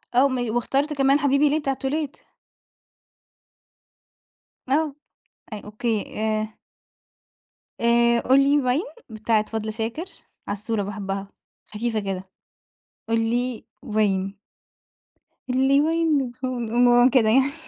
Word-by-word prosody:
آه 260 Hz, +3 st, +6 dB
مي 245 Hz, -3 st, -2 dB
واختارت 275 Hz, +6 st, 0 dB
كمان 275 Hz, 0 st, +3 dB
حبيبي 285 Hz, 0 st, +3 dB
ليه 305 Hz, +2 st, +1 dB
بتاعة 275 Hz, -3 st, -1 dB
توليت. 285 Hz, +2 st, -3 dB, 2.5 s
آه، 295 Hz, +1 st, +1 dB, 0.6 s
أي 210 Hz, -, -5 dB
أوكي، 215 Hz, 0 st, -3 dB
آآ 215 Hz, 0 st, -2 dB, 1.2 s
آآ 235 Hz, 0 st, +4 dB
قُل 260 Hz, +3 st, +4 dB
لي 285 Hz, +1 st, +4 dB
وين 255 Hz, +6 st, +1 dB, 0.3 s
بتاعة 220 Hz, 0 st, 0 dB
فضل 220 Hz, -1 st, -3 dB
شاكر، 230 Hz, +9 st, -4 dB, 0.4 s
عسولة 210 Hz, +1 st, -2 dB
باحبها 195 Hz, -1 st, -4 dB, 0.4 s
خفيفة 220 Hz, +1 st, -2 dB
كده، 190 Hz, -2 st, -5 dB, 0.8 s
قُل 230 Hz, 0 st, +2 dB
لي 240 Hz, +1 st, -1 dB, 0.2 s
وين. 200 Hz, -4 st, 0 dB, 1.1 s
قُل 260 Hz, +1 st, +2 dB
لي 275 Hz, +1 st, +5 dB
وين 320 Hz, -2 st, +2 dB, 0.2 s
الهم 255 Hz, -1 st, -2 dB
المُهم 245 Hz, +2 st, +5 dB
كده 250 Hz, -5 st, +3 dB
يعني. 265 Hz, +4 st, +3 dB
240 Hz, 110 wpm, -23 LUFS, 215-275 Hz, 2.5 s, آه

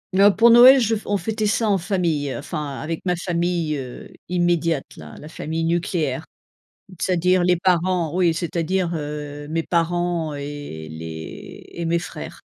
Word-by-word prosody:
Oh 200 Hz, +2 st, +7 dB
pour 230 Hz, +5 st, +5 dB
Noël 250 Hz, +3 st, +9 dB
je 225 Hz, -2 st, +1 dB
on 205 Hz, -, 0 dB
fêtait 215 Hz, +1 st, -2 dB
ça 220 Hz, +2 st, +1 dB
en 200 Hz, -, +3 dB
famille, 170 Hz, -6 st, -1 dB
heu, -, -, -4 dB
enfin 145 Hz, -1 st, -5 dB
avec 160 Hz, +1 st, -4 dB
ma 180 Hz, -1 st, +1 dB
famille, 170 Hz, -3 st, -1 dB
heu, 130 Hz, -3 st, -8 dB, 0.2 s
immédiate 170 Hz, -4 st, 0 dB
là, -, -, -11 dB
la 150 Hz, -, -10 dB
famille 160 Hz, +1 st, -3 dB
nucléaire, 165 Hz, -4 st, -1 dB, 0.8 s
c'est-à-dire 180 Hz, 0 st, +2 dB
les 180 Hz, 0 st, +3 dB
parents, 180 Hz, -2 st, +1 dB
oui, 175 Hz, -3 st, +3 dB
c'est-à-dire, 170 Hz, +1 st, -1 dB
heu, 145 Hz, -1 st, -5 dB
mes 165 Hz, +1 st, -1 dB
parents 170 Hz, -2 st, 0 dB
et 140 Hz, -, -7 dB
les 80 Hz, 0 st, -8 dB
et 170 Hz, -, -5 dB
mes 170 Hz, +1 st, +2 dB
frères. 170 Hz, -, -7 dB
170 Hz, 160 wpm, -22 LUFS, 150-180 Hz, 0.8 s, Noël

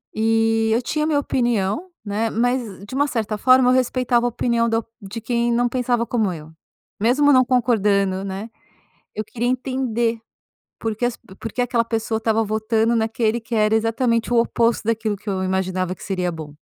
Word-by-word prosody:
E, 225 Hz, 0 st, +2 dB
eu 235 Hz, -, +2 dB
tinha 305 Hz, +5 st, -1 dB
a -, -, 0 dB
minha 300 Hz, -2 st, +2 dB
opinião, 240 Hz, -, -1 dB, 0.2 s
né, 215 Hz, +2 st, -1 dB
mas 230 Hz, -4 st, -1 dB
de 205 Hz, -, -11 dB
uma 285 Hz, +2 st, +2 dB
certa 225 Hz, -5 st, -2 dB
forma 255 Hz, +2 st, +5 dB
eu -, -, +4 dB
respeitava 250 Hz, -1 st, +2 dB
a -, -, +1 dB
opinião 235 Hz, 0 st, 0 dB
da 225 Hz, 0 st, 0 dB, 0.2 s
de 200 Hz, +3 st, -7 dB
quem 235 Hz, +1 st, 0 dB
não 240 Hz, +1 st, +2 dB
pensava 245 Hz, -1 st, 0 dB
como 220 Hz, -6 st, 0 dB
eu. 160 Hz, -2 st, -9 dB, 0.5 s
Mesmo 270 Hz, +7 st, +4 dB
não 255 Hz, -1 st, +6 dB
concordando, 205 Hz, -6 st, +1 dB
né. 195 Hz, +3 st, -5 dB, 0.7 s
Eu 215 Hz, -, -3 dB
queria 240 Hz, +3 st, -3 dB
entender 250 Hz, -3 st, -1 dB, 0.6 s
porque 225 Hz, +1 st, -2 dB
as 245 Hz, -1 st, -1 dB
pe 190 Hz, -, -17 dB
porque 225 Hz, +4 st, -4 dB
aquela 245 Hz, -1 st, +1 dB
pessoa 225 Hz, -1 st, -1 dB
estava 225 Hz, 0 st, +1 dB
votando 220 Hz, +2 st, +1 dB
naquele 225 Hz, 0 st, 0 dB
que 230 Hz, +1 st, -9 dB
era 215 Hz, -1 st, +3 dB
exatamente 230 Hz, +1 st, +1 dB
o 240 Hz, -, +3 dB
oposto 230 Hz, 0 st, +2 dB
daquilo 220 Hz, -1 st, 0 dB
que 205 Hz, +2 st, -8 dB
eu 190 Hz, -1 st, -1 dB
imaginava 185 Hz, -1 st, -1 dB
que -, -, -13 dB
seria 180 Hz, -3 st, -1 dB
bom. 150 Hz, -3 st, -9 dB
225 Hz, 185 wpm, -21 LUFS, 210-245 Hz, 0.7 s, não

